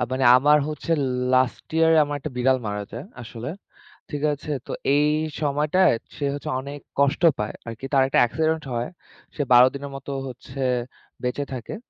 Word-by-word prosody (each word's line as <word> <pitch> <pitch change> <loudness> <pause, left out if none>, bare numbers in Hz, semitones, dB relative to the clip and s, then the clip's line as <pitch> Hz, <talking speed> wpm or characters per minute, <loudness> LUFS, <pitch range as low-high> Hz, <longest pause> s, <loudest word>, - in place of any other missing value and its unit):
মানে 130 0 0
আমার 150 +3 +5
হচ্ছে 155 +2 -6 0.4
লাস্ট 130 0 +2
ইয়ার 165 0 +5
এ - - +6
আমার 145 0 -3
১ 135 - -20
টা - - -2
বিড়াল 130 +1 +3
মারা 105 0 -3
যায়, 115 +5 -6 0.2
আসলে। 115 +1 -7 0.6
ঠিক 145 -1 -4
আছে? 150 +1 -6 0.2
তো - - -5 0.2
এই 150 +1 +3 0.3
সময়টায় 150 +5 +3 0.2
সে 145 - -5
হচ্ছে 145 - -6
অনেক 140 +2 -7 0.2
কষ্ট 140 +4 +2 0.2
পায়। 105 0 -2
আরকি 115 +3 -7
তার 135 -1 +5
একটা 135 - +2
অ্যাক্সিডেন্ট 160 +6 +1
হয়। 120 +1 -1 0.5
সে 150 - -2
১২ 125 0 +9
দিনের 140 0 -6
মতো 135 +1 -7 0.2
হচ্ছে 130 +2 -10 0.6
বেঁচে 135 +3 -1
থাকে। 125 - -6
140 Hz, 175 wpm, -24 LUFS, 125-150 Hz, 0.6 s, ১২